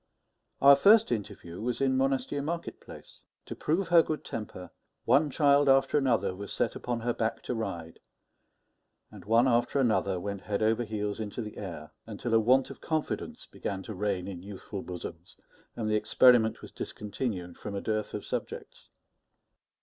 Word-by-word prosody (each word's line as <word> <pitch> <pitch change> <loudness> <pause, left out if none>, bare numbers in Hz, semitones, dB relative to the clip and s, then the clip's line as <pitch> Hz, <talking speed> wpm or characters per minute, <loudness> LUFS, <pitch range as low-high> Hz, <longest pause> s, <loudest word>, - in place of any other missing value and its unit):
Our 140 0 +9
first 210 - +5
interview 100 -6 -5
was 120 +1 -2
in 135 -1 +2
Monastier 135 +1 0
market 170 +4 -4
place. - - -13 0.2
To - - -7
prove 165 +3 -1
her 170 -1 +7
good 155 -1 -4
temper, 105 -4 -7 0.3
one 150 +1 +4
child 145 0 +4
after 135 +2 +4
another 115 -10 +2
was 100 +1 -7
set - - -1
upon 120 -1 -3
her 120 +1 0
back 115 0 -2
to - - -3
ride, 85 -8 -5 1.1
and - - -12
one 115 +4 +4
after 120 +3 +2
another 105 -7 +1
went 100 +1 -5
head 105 0 -2
over 110 +2 +2
heels 105 -1 -3
into 110 +2 -4
the 105 - -9
air; 80 -6 -7 0.2
until 115 +2 -4
a 115 - +6
want 130 +4 +3
of - - -12
confidence 155 -2 -3
began 95 -1 -5
to 110 - -7
reign 95 -2 -2
in 90 -3 -7
youthful 100 0 -7
bosoms, 90 -1 -8 0.4
and 110 -2 -3
the 105 - +1
experiment 115 0 +4
was - - -10
discontinued 100 -4 -5
from 105 -1 -6
a - - -1
dearth 110 -1 -2
of - - -5
subjects. - - -6
110 Hz, 170 wpm, -29 LUFS, 100-135 Hz, 1.1 s, Our